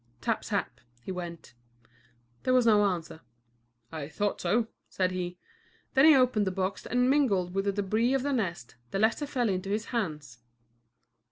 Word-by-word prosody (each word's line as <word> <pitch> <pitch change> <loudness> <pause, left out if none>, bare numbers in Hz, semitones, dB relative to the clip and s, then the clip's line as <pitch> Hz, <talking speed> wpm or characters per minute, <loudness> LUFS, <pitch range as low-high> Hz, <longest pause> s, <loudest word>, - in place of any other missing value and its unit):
"Tap, - - -1
tap," - - -3 0.2
he - - -5
went. 175 -5 -7 0.9
There 255 - +2
was 250 -2 +4
no 210 -2 +5
answer. 170 -4 -3 0.7
"I 155 -3 -5
thought 205 +6 -2
so," 230 +2 +2 0.2
said 185 -1 0
he. 180 -1 -4 0.6
Then 270 +1 +6
he 315 -2 +8
opened 250 -6 +3
the - - +1
box 190 +1 -3
and, 250 +1 +2
mingled 210 -11 +2
with 195 +1 -1
the 200 0 0
débris 225 +7 +1
of 265 - 0
the 285 0 0
nest, 175 - -3
the - - -2
letter 225 +8 +1
fell 250 -4 0
into 190 -1 -2
his 210 +2 -1
hands. 150 - -3
200 Hz, 170 wpm, -29 LUFS, 180-245 Hz, 0.9 s, he